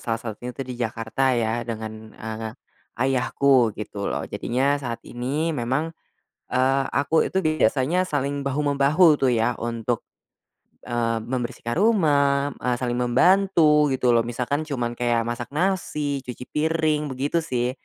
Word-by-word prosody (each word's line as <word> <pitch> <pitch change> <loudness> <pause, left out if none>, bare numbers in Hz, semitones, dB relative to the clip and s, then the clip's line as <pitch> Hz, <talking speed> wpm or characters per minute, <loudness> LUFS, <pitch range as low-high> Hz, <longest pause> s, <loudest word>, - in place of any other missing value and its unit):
salah 115 -1 -1
satunya 115 +1 -7
tuh 135 - -4
di 125 0 -6
Jakarta 115 +3 0
ya 115 0 0
dengan, 110 -1 -6
eee, 110 0 -5 0.5
ayahku 130 0 +3
gitu 105 -1 -5
loh 70 - -2
jadinya 140 +4 0
saat 120 -4 -5
ini 140 +7 -2
memang, 135 +5 -1 0.6
eee, 135 +2 +2
aku 145 +4 +2
itu 190 -1 -1
biasanya 155 +4 +2
saling 140 -1 -2
bahu-membahu 145 +3 +3
tuh 135 - +2
ya 115 +1 0
untuk, 115 0 -3 0.8
eee, 115 -2 -1
membersihkan 120 +1 -3
rumah, 145 -9 +3
eee, 125 0 0
saling 120 0 -1
membantu 155 +3 +4
gitu 125 -1 +2
loh 115 -1 +3
misalkan 130 +6 -2
cuman 120 -5 -3
kayak 120 -1 +1
masak 120 +1 -4
nasi, 150 -5 0
cuci 125 0 -7
piring, 155 -1 +1
begitu 140 +5 -1
sih. 125 -6 -1
130 Hz, 140 wpm, -24 LUFS, 120-150 Hz, 0.8 s, membantu